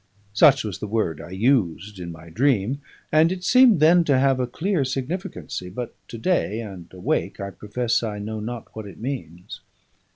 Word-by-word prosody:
Such 135 Hz, +5 st, +6 dB
was 105 Hz, -5 st, -5 dB
the 105 Hz, -, -4 dB
word 100 Hz, -8 st, -1 dB
I 85 Hz, -, -10 dB
used 100 Hz, -2 st, 0 dB
in 85 Hz, -1 st, -6 dB
my 80 Hz, 0 st, -12 dB
dream, 130 Hz, -, +1 dB, 0.3 s
and 155 Hz, +2 st, +5 dB
it 185 Hz, -1 st, -4 dB
seemed 250 Hz, -3 st, +6 dB
then 170 Hz, +3 st, +6 dB
to 140 Hz, -4 st, +3 dB
have 135 Hz, 0 st, +3 dB
a 125 Hz, -, 0 dB
clear 170 Hz, +5 st, 0 dB
significancy; 135 Hz, -, -4 dB
but 120 Hz, +6 st, -6 dB
to 115 Hz, -, -8 dB
day, 115 Hz, -, 0 dB
and 95 Hz, -6 st, -8 dB
awake, 90 Hz, -1 st, -2 dB
I 100 Hz, 0 st, -4 dB
profess 115 Hz, +4 st, -1 dB
I 110 Hz, -3 st, -3 dB
know 110 Hz, +1 st, -5 dB
not 115 Hz, +2 st, -7 dB
what 110 Hz, -2 st, -6 dB
it 95 Hz, -, -11 dB
means. 110 Hz, -, -6 dB
115 Hz, 185 wpm, -23 LUFS, 100-140 Hz, 0.3 s, Such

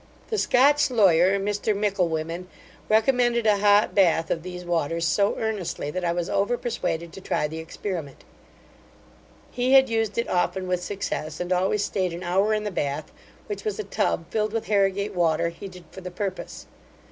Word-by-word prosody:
The 440 Hz, -, 0 dB
Scotch 280 Hz, +3 st, +4 dB
lawyer, 190 Hz, -5 st, +4 dB
Mr 205 Hz, +1 st, -1 dB
Micklewhimmen, 180 Hz, -4 st, -1 dB, 0.4 s
recommended 235 Hz, +1 st, +3 dB
a 210 Hz, -2 st, +4 dB
hot 205 Hz, +1 st, +4 dB
bath 170 Hz, -4 st, +3 dB
of 165 Hz, -, 0 dB
these 180 Hz, +1 st, -8 dB
waters 165 Hz, -1 st, -1 dB
so 200 Hz, +4 st, +2 dB
earnestly, 205 Hz, -9 st, -3 dB
that 185 Hz, +3 st, -4 dB
I 170 Hz, -, +1 dB
was 175 Hz, 0 st, -2 dB
over 205 Hz, +6 st, 0 dB
persuaded 170 Hz, -9 st, -3 dB
to 195 Hz, -, -9 dB
try 150 Hz, -, -1 dB
the 160 Hz, +2 st, -7 dB
experiment. 160 Hz, -2 st, -6 dB, 1.3 s
He 250 Hz, +2 st, +1 dB
had 265 Hz, -1 st, +7 dB
used 225 Hz, -2 st, -1 dB
it 235 Hz, -, 0 dB
often 185 Hz, +1 st, 0 dB
with 180 Hz, -1 st, 0 dB
success 155 Hz, -6 st, -4 dB
and 180 Hz, +1 st, -1 dB
always 190 Hz, +3 st, +1 dB
stayed 185 Hz, -3 st, -1 dB
an 175 Hz, +2 st, -6 dB
hour 190 Hz, +4 st, +1 dB
in 215 Hz, 0 st, 0 dB
the 210 Hz, -, -3 dB
bath, 145 Hz, -3 st, -3 dB, 0.3 s
which 415 Hz, -, -6 dB
was 430 Hz, -1 st, -2 dB
a 430 Hz, -, -3 dB
tub -, -, -1 dB
filled 215 Hz, -1 st, -1 dB
with 225 Hz, -, -2 dB
Harrigate 200 Hz, 0 st, +1 dB
water, 170 Hz, -2 st, +1 dB
heated 180 Hz, +1 st, -10 dB
for 190 Hz, -, -10 dB
the 180 Hz, -, -6 dB
purpose. 185 Hz, +1 st, -5 dB
195 Hz, 175 wpm, -25 LUFS, 170-215 Hz, 1.3 s, had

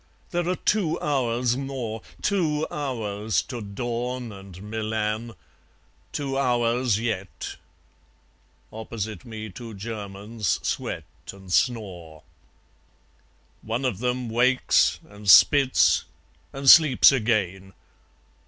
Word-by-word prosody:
There 175 Hz, -1 st, -1 dB
are 180 Hz, -, +1 dB
two 180 Hz, -7 st, 0 dB
hours 125 Hz, -4 st, 0 dB
more; 130 Hz, -5 st, -4 dB, 0.2 s
Two 160 Hz, -7 st, +1 dB
hours 110 Hz, -7 st, -2 dB
to 120 Hz, -3 st, -7 dB
dawn 120 Hz, +3 st, -4 dB
and 95 Hz, -2 st, -11 dB
Milan; 110 Hz, +1 st, -3 dB, 0.8 s
two 135 Hz, -2 st, -2 dB
hours 120 Hz, -3 st, +1 dB
yet. 105 Hz, -5 st, -4 dB, 1.2 s
Opposite 110 Hz, -3 st, -6 dB
me 110 Hz, -2 st, -7 dB
two 115 Hz, +3 st, -9 dB
Germans 105 Hz, 0 st, -4 dB
sweat -, -, -3 dB, 0.3 s
and 95 Hz, -2 st, -9 dB
snore.... 90 Hz, -, -1 dB, 1.4 s
One 115 Hz, +4 st, -3 dB
of 115 Hz, -7 st, -1 dB
them 125 Hz, 0 st, -1 dB
wakes, 125 Hz, +3 st, +3 dB
and 105 Hz, 0 st, -6 dB
spits, 135 Hz, +5 st, +6 dB, 0.5 s
and 135 Hz, 0 st, -6 dB
sleeps 150 Hz, -3 st, +8 dB
again. 100 Hz, -6 st, -1 dB
115 Hz, 95 wpm, -25 LUFS, 105-130 Hz, 1.4 s, sleeps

